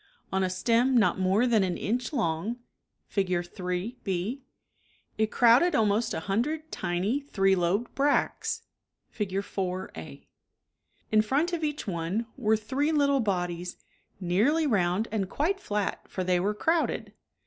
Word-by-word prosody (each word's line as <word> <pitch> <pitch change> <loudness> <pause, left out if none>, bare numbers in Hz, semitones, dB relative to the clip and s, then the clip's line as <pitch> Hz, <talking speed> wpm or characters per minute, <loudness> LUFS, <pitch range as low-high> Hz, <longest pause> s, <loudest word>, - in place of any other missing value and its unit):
On 190 - +2
a 185 - +1
stem 235 +7 +2
not 215 -3 +3
more 190 +5 +3
than 230 -4 +3
an 185 -2 0
inch 240 +6 -2
long, 215 - -1 0.5
(Fig. 180 -3 -1
3, 180 +6 -4
6) 195 +8 -2 0.8
it 220 0 +2
crowded 245 +11 +5
al 220 - +4
most 210 +3 +1
a - - -3
hundred 285 - -2
tiny 185 +9 -1
three 195 -9 +1
lobed 185 +6 0
bracts 285 +1 0 0.5
{Fig. 200 -2 -2
4, 185 -2 -3
a) 80 -4 -10 0.8
In 215 0 +5
front 285 +11 0
of 330 -2 -2
each 295 -1 -2
one 185 +4 -2
were 220 +1 +2
three 270 +8 -1
little 280 -2 +3
bodies, 180 -5 -2 0.4
nearly 215 - +2
round 200 -3 +1
and 200 -4 -1
quite 355 - 0
flat 210 - -3
for 185 - -3
they 180 -1 +2
were 205 +4 0
crowded. 325 +9 0
210 Hz, 150 wpm, -28 LUFS, 185-255 Hz, 0.8 s, crowded